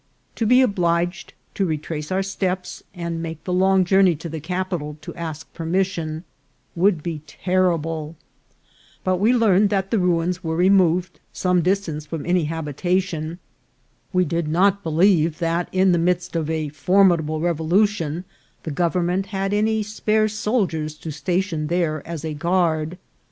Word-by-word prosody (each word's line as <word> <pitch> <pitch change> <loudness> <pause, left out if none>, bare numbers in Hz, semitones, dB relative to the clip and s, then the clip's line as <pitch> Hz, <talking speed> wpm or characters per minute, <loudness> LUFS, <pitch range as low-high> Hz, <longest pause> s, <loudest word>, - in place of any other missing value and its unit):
To 225 - 0
be 250 +3 +6
obliged 175 -5 0 0.2
to 195 - -1
retrace 155 -2 -3
our 190 +1 +1
steps, 190 -1 -3
and 170 -1 -4
make 165 -1 -6
the 180 - -3
long 190 0 +3
journey 190 -1 +4
to 165 +3 -7
the 160 0 -5
capital 175 -3 -3
to - - -8
ask 160 -2 -7
permission, 165 -2 -2 0.5
would 175 -3 +2
be 165 -3 -4
terrible; 165 -4 -1 0.9
but 185 -1 +1
we 210 +6 +3
learned 210 -5 +4
that 195 -1 -1
the 225 - +2
ruins 180 0 0
were 160 -1 -2
removed 180 -1 +3
some 180 -1 +1
distance 170 -4 -1
from 155 -1 -5
any 175 -1 +2
habitation; 165 +2 -2 0.7
we 185 -1 +2
did 165 0 -1
not 195 +5 +2
believe 165 -1 +3
that, 170 0 -1
in 185 0 +3
the 175 - +3
midst 175 +1 0
of 160 -2 -1
a 160 -2 -1
formidable 160 0 +2
revolution, 170 +1 +1 0.4
the 160 - -4
gov 170 +3 0
ernment 180 +2 0
had 195 0 -2
any 215 +1 +1
spare 215 +1 +1
soldiers 200 -8 -1
to 155 +1 -7
station 175 0 -1
there 165 -3 0
as 165 -2 -5
a 155 - -3
guard. 165 0 0
175 Hz, 150 wpm, -22 LUFS, 160-190 Hz, 0.9 s, be